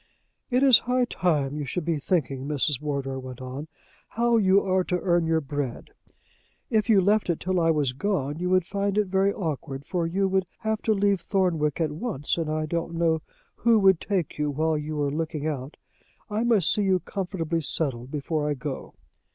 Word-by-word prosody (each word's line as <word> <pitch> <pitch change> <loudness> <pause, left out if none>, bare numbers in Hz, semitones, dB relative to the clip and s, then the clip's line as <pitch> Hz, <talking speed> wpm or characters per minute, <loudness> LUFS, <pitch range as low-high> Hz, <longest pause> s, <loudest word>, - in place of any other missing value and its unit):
"It 255 +1 +2
is 260 -5 +8
high 250 0 +3
time 150 - 0
you 145 - -3
should 175 +3 -3
be 165 -3 0
thinking," 135 -4 -1
Mrs. 145 -2 0
Wardour 140 -3 -3
went 130 -1 -8
on, 130 +4 -6 0.4
"how 235 +1 +2
you 195 -2 +5
are 185 -1 +2
to 180 - -1
earn 175 -2 +1
your 160 0 +2
bread. 145 -3 -4 0.8
If 220 -1 +2
you 210 -3 +6
left 205 +1 +2
it 170 - 0
till 185 0 0
I 165 -1 +3
was 145 -5 +1
gone, 150 -2 -2
you 180 0 -1
would 185 -1 +3
find 200 +1 -1
it 210 - +3
very 190 +1 +2
awkward, 150 -7 -4
for 175 -3 -1
you 195 +3 +1
would 190 -1 0
have 220 0 -1
to 220 - +2
leave 200 -2 +2
Thornwick 170 -6 0
at 160 -3 0
once, 155 - -2
and 160 -2 -2
I 155 0 -1
don't 170 +1 -3
know 165 -1 +1 0.4
who 230 -1 +4
would 190 -4 +4
take 185 -7 -2
you 150 0 +1
while 155 +3 0
you 150 +1 -4
were 145 -1 0
looking 155 0 -3
out. 145 -2 -4 0.5
I 215 +3 0
must 220 -8 +4
see 210 - +1
you 190 -2 +2
comfortably 175 -4 -3
settled 130 -5 -1
before 150 +1 -2
I 145 - 0
go." 135 +1 -6
165 Hz, 200 wpm, -26 LUFS, 150-195 Hz, 0.8 s, is